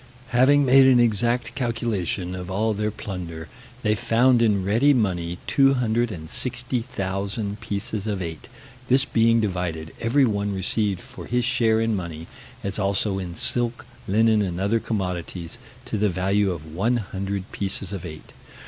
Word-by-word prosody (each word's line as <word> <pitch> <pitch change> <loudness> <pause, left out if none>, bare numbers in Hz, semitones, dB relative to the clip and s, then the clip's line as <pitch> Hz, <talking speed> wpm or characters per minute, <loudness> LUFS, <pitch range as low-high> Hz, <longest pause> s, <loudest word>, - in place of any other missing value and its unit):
Having 135 +3 +4
made 135 +1 +7
an 130 -2 +6
exact 120 +1 +1
calculation 115 -7 -2
of 90 0 -6
all 110 +4 0
their 105 +1 -1
plunder, 90 -6 -6 0.4
they 105 - +3
found 120 +3 +3
in 105 -5 +2
ready 120 +8 +4
money 90 -6 -1
260,000 115 - -1
pieces 100 +1 -4
of 105 -3 -1
eight: 80 -3 -6 0.4
this 130 +2 +5
being 115 -1 +3
divided, 90 -6 -2
every 130 +4 +3
one 100 -3 -1
received 95 0 0
for - - -10
his 125 0 0
share 115 -3 +2
in 115 -1 +1
money, 85 -4 -5 0.4
as 100 +1 -2
also 100 0 0
in 90 -2 -6
silk, 120 +5 -1 0.2
linen, 110 +2 +3
and 90 -3 -2
other 100 +4 +1
commodities, 90 -5 -4 0.3
to 110 - -3
the 105 0 +3
value 95 +3 +1
of 80 -3 -6
100 100 -1 -2
pieces 100 0 -2
of 95 - -5
eight. 80 -3 -9
105 Hz, 145 wpm, -24 LUFS, 95-115 Hz, 0.4 s, made